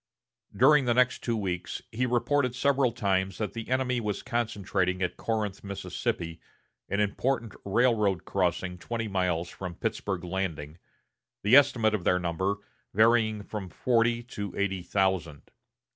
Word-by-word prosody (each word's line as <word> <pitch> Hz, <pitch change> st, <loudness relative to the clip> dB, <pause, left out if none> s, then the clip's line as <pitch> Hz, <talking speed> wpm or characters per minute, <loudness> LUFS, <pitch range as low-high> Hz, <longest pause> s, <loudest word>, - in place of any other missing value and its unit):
During 135 Hz, +2 st, +6 dB
the 120 Hz, -1 st, +2 dB
next 125 Hz, 0 st, +3 dB
two 115 Hz, -2 st, 0 dB
weeks 90 Hz, -4 st, -3 dB
he 125 Hz, +3 st, 0 dB
reported 125 Hz, +2 st, +1 dB
several 135 Hz, -1 st, +2 dB
times 95 Hz, -5 st, 0 dB
that 110 Hz, -, -3 dB
the 115 Hz, 0 st, -6 dB
enemy 130 Hz, -1 st, +1 dB
was 105 Hz, -3 st, -3 dB
concentrating 100 Hz, -5 st, -1 dB
at 90 Hz, -, -1 dB
Corinth, 105 Hz, -4 st, -2 dB
Mississippi, 95 Hz, -3 st, -4 dB, 0.5 s
an 100 Hz, -, 0 dB
important 115 Hz, +3 st, 0 dB
railroad 105 Hz, -3 st, +2 dB
crossing 90 Hz, -1 st, -1 dB
twenty 115 Hz, +3 st, -3 dB
miles 90 Hz, -3 st, 0 dB
from 90 Hz, -3 st, -7 dB
Pittsburg 95 Hz, 0 st, -3 dB
Landing, 85 Hz, -4 st, -4 dB, 0.6 s
the 105 Hz, +5 st, +6 dB
estimate 115 Hz, -6 st, +5 dB
of 105 Hz, -5 st, -1 dB
their 90 Hz, -, +3 dB
number 90 Hz, +3 st, -1 dB, 0.4 s
varying 110 Hz, -1 st, +4 dB
from 100 Hz, -3 st, -6 dB
forty 115 Hz, +2 st, +1 dB
to 105 Hz, -5 st, -6 dB
eighty 95 Hz, -2 st, 0 dB
thousand. 90 Hz, -5 st, -1 dB
105 Hz, 140 wpm, -28 LUFS, 95-120 Hz, 0.6 s, During